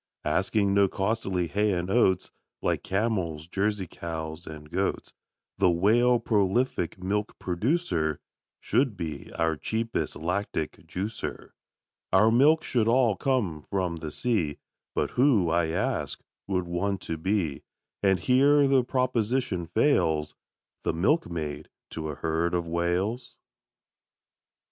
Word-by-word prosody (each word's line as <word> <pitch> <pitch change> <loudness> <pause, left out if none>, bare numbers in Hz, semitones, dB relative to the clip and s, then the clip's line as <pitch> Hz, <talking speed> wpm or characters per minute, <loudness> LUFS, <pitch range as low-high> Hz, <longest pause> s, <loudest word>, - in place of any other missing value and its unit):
Asking 100 +1 +1
no 100 0 +5
costly 95 -2 -1
hay 105 +4 +1
and 90 0 -1
oats, 95 -6 +2 0.3
Like - - +1
camels, 95 -7 -1
Jersey 100 +1 -1
cows, 80 0 -6
and 75 -1 -9
goats, 95 +2 -2 0.5
The 90 - +5
Whale, 115 +8 +4
prolific 105 -3 +1
milk 100 +3 -2
producer, 90 - 0 0.4
Should 125 -5 +1
be 80 -4 -5
our 80 -1 +1
cheapest 115 +8 -2
lactic 90 -1 -3
juicer. 100 +4 -5 0.6
Our 105 +4 +5
milk 150 +7 +5
should 115 -3 +1
all 120 -3 +4
come 110 - 0
from 90 -4 -1
the 80 -1 -5
sea, 85 -5 -1 0.4
But - - 0
who, 120 - +3
I 85 -1 +2
ask, 80 - -2 0.3
would 90 -2 0
want 95 +3 -1
to 80 - -3
be, 90 -6 -1 0.4
And 95 -2 +3
here 140 - +4
the 135 -2 +4
proposition 120 -7 0
fails, 80 - +2 0.5
The - - -1
milkmaid 80 - -1 0.2
to 80 -1 -4
a 75 - -4
herd 80 +4 0
of 85 -1 -1
Whales? 90 +9 -1
95 Hz, 125 wpm, -27 LUFS, 85-115 Hz, 0.6 s, no